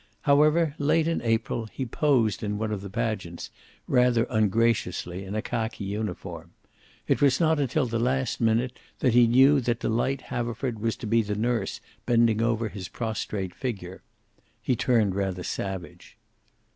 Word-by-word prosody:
However, 150 Hz, +2 st, +4 dB
late 155 Hz, +2 st, +2 dB
in 165 Hz, -, 0 dB
April, 115 Hz, 0 st, -1 dB
he 130 Hz, +4 st, -5 dB
posed 120 Hz, -, +1 dB
in 105 Hz, -1 st, -2 dB
one 110 Hz, 0 st, -2 dB
of 105 Hz, -3 st, -3 dB
the 100 Hz, -, -7 dB
pageants, 100 Hz, -5 st, -3 dB, 0.4 s
rather 125 Hz, -2 st, +3 dB
ungraciously, 105 Hz, -4 st, +1 dB
in 95 Hz, +2 st, -6 dB
a 110 Hz, -, -1 dB
khaki 110 Hz, -3 st, -3 dB
uniform. 90 Hz, -5 st, -5 dB, 0.5 s
It -, -, +1 dB
was 135 Hz, -2 st, +4 dB
not 160 Hz, -2 st, +3 dB
until 140 Hz, +1 st, +1 dB
the 115 Hz, -1 st, -2 dB
last 130 Hz, +1 st, 0 dB
minute 115 Hz, +3 st, +1 dB, 0.2 s
that 125 Hz, -, +1 dB
he 120 Hz, -1 st, +6 dB
knew 135 Hz, +4 st, +5 dB
that 120 Hz, -1 st, -1 dB
Delight 125 Hz, +4 st, 0 dB
Haverford 120 Hz, 0 st, -3 dB
was 115 Hz, +1 st, -1 dB
to -, -, -8 dB
be 115 Hz, +2 st, +3 dB
the 105 Hz, -1 st, -3 dB
nurse 115 Hz, -1 st, -1 dB, 0.3 s
bending 115 Hz, -2 st, +3 dB
over 115 Hz, -1 st, +1 dB
his 95 Hz, -2 st, -7 dB
prostrate 105 Hz, -4 st, -4 dB
figure. 95 Hz, -8 st, -5 dB, 0.6 s
He 125 Hz, -, 0 dB
turned 110 Hz, -5 st, +2 dB
rather 95 Hz, -2 st, -2 dB
savage. 95 Hz, -2 st, -6 dB
115 Hz, 160 wpm, -26 LUFS, 105-125 Hz, 0.6 s, he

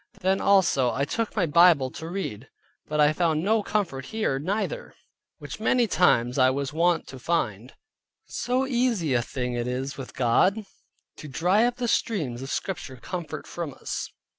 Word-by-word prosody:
Then 190 Hz, +1 st, +1 dB
also 175 Hz, -11 st, +3 dB
I 140 Hz, +5 st, -1 dB
took 225 Hz, +9 st, -3 dB
my 195 Hz, -5 st, +2 dB
Bible 160 Hz, -4 st, +5 dB
to 160 Hz, +5 st, -7 dB
read, 135 Hz, -, -5 dB, 0.4 s
but 150 Hz, 0 st, -2 dB
I 150 Hz, 0 st, +5 dB
found 160 Hz, -1 st, +1 dB
no 220 Hz, +3 st, +2 dB
comfort 190 Hz, -11 st, -2 dB
here 215 Hz, -12 st, -1 dB
neither, 210 Hz, -, -3 dB, 0.4 s
which -, -, -8 dB
many 245 Hz, -2 st, +3 dB
times 125 Hz, -, +2 dB
I 130 Hz, 0 st, +6 dB
was 140 Hz, +1 st, -2 dB
wont 170 Hz, +1 st, +2 dB
to 130 Hz, -, -9 dB
find. 120 Hz, -, -2 dB, 0.5 s
So 255 Hz, +2 st, -1 dB
easy 240 Hz, -, +1 dB
a 120 Hz, -, +3 dB
thing 125 Hz, 0 st, -4 dB
it 120 Hz, 0 st, -2 dB
is 135 Hz, +2 st, -3 dB
with 130 Hz, -, -8 dB
God 185 Hz, -, +2 dB, 0.5 s
to 155 Hz, -, -9 dB
dry 180 Hz, -, +2 dB
up 245 Hz, 0 st, 0 dB
the 245 Hz, -1 st, -2 dB
streams 150 Hz, -, -1 dB
of 135 Hz, -, -6 dB
Scripture 155 Hz, -8 st, -4 dB
comfort 170 Hz, +5 st, -6 dB
from 165 Hz, -6 st, -6 dB
us. -, -, -5 dB
160 Hz, 170 wpm, -26 LUFS, 130-200 Hz, 0.5 s, I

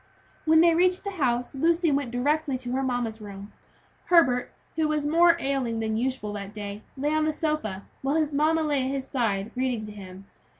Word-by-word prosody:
When 320 Hz, 0 st, +6 dB
they 335 Hz, 0 st, +5 dB
reached 360 Hz, +2 st, +2 dB
the 400 Hz, -, -3 dB
house 250 Hz, -9 st, -1 dB
Lucy 330 Hz, +3 st, +2 dB
went 280 Hz, -3 st, 0 dB
directly 280 Hz, +3 st, 0 dB
to 245 Hz, -1 st, -6 dB
her 265 Hz, +2 st, 0 dB
mamma's 245 Hz, -4 st, -2 dB
room. 200 Hz, 0 st, -9 dB, 0.5 s
Herbert, 270 Hz, -9 st, +3 dB, 0.2 s
who 315 Hz, -1 st, +1 dB
was 300 Hz, -1 st, 0 dB
more 335 Hz, +3 st, +5 dB
ailing 265 Hz, -5 st, -1 dB
than 220 Hz, -1 st, -1 dB
usual 240 Hz, -3 st, -2 dB
that 200 Hz, 0 st, -7 dB
day, 205 Hz, 0 st, -6 dB, 0.2 s
lay 290 Hz, +3 st, 0 dB
on 310 Hz, 0 st, +2 dB
a -, -, +2 dB
sofa, 300 Hz, -, -2 dB, 0.2 s
while 275 Hz, +2 st, 0 dB
his 305 Hz, -2 st, +1 dB
mamma 310 Hz, +3 st, +2 dB
sat 310 Hz, -, -1 dB
by 290 Hz, -1 st, +1 dB
his 265 Hz, 0 st, -2 dB
side, 220 Hz, -6 st, -1 dB
reading 250 Hz, -3 st, -1 dB
to 210 Hz, -, -8 dB
him. 195 Hz, -2 st, -11 dB
265 Hz, 200 wpm, -26 LUFS, 225-310 Hz, 0.5 s, When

